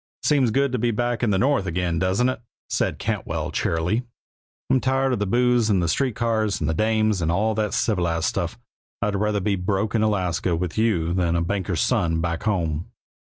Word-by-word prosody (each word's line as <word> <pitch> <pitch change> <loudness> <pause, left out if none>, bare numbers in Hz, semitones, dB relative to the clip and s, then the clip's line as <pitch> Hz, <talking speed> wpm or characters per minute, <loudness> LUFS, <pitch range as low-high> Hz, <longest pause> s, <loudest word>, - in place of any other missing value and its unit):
"Seems 140 -5 +3
good 140 +4 +1
to 125 - -1
be 120 +1 +1
back 120 +1 -1
in 120 - +2
the 100 - +2
North 130 -3 +1
again, 90 -2 -1
doesn't 95 +7 +2
it?" 130 -3 -2 0.3
said - - 0
Cantwell, - - -3
cheerily. 85 +8 0 0.7
"I'm 130 - +3
tired 135 0 +1
of 120 - -1
the 105 - -1
booze, 120 +1 +2
and 100 -3 +3
the 85 - 0
street 125 +6 0
cars, 110 -3 0
and 75 - -1
the 80 - +1
dames, 110 +1 +1
and 80 0 +1
all 105 +5 +1
that 105 0 -1
civilized 85 -8 0
stuff. 90 0 -2 0.5
I'd 105 -1 0
rather 105 +1 0
be 100 +1 0
broke 95 +3 -1
in 110 - +2
Alaska 90 -5 0
with 85 0 -3
you 95 -7 +1
than 85 -2 +1
a 85 - +1
banker's 95 -2 -1
son, 85 -10 +1
back 85 0 -2
home." 85 -7 -1
105 Hz, 205 wpm, -23 LUFS, 85-115 Hz, 0.7 s, Seems